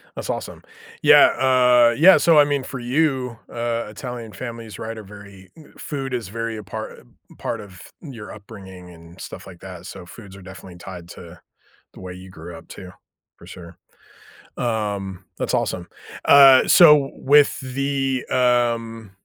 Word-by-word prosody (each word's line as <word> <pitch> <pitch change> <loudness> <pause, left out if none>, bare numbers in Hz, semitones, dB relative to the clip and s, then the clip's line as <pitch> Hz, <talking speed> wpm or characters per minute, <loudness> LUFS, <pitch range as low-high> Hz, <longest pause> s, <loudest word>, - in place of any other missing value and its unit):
That's - - -7
awesome. - - -5 0.4
Yeah, - - +7
uh, 125 -2 +3
yeah 185 +6 +7
so, 165 -2 +4
I 150 - +8
mean, 145 -2 -1
for 135 0 -7
you, 125 -2 -1
uh, 115 0 -3
Italian 115 +1 -8
families, 115 -2 -8
right? 115 0 -7
Are 110 - -9
very 100 -2 -14 0.3
food 135 -3 -6
is 120 -5 -3
very 115 +3 -5
a 105 - -8
part 110 +2 -8 0.4
part - - -4
of 95 -4 -14 0.2
your 125 -10 -10
upbringing 95 -3 -12
and 85 +1 -16
stuff - - -10
like 90 -3 -13
that, 90 -2 -10
so, 90 - -10
foods 100 +1 -13
are - - -13
definitely 95 -1 -12
tied 90 -1 -10
to 85 0 -13 0.5
the - - -14
way 90 -1 -8
you 95 +1 -12
grew 85 -1 -11
up 80 - -14
too, 90 -1 -11 0.5
for - - -16
sure. 85 -1 -12 0.8
Um, 100 -5 -3
that's - - -3
awesome. 90 -1 -3 0.4
Uh, 135 -2 +7
so, 150 -5 +6
with 145 +1 +3
the, 135 0 -2
um 115 -3 0
115 Hz, 160 wpm, -21 LUFS, 95-130 Hz, 0.8 s, I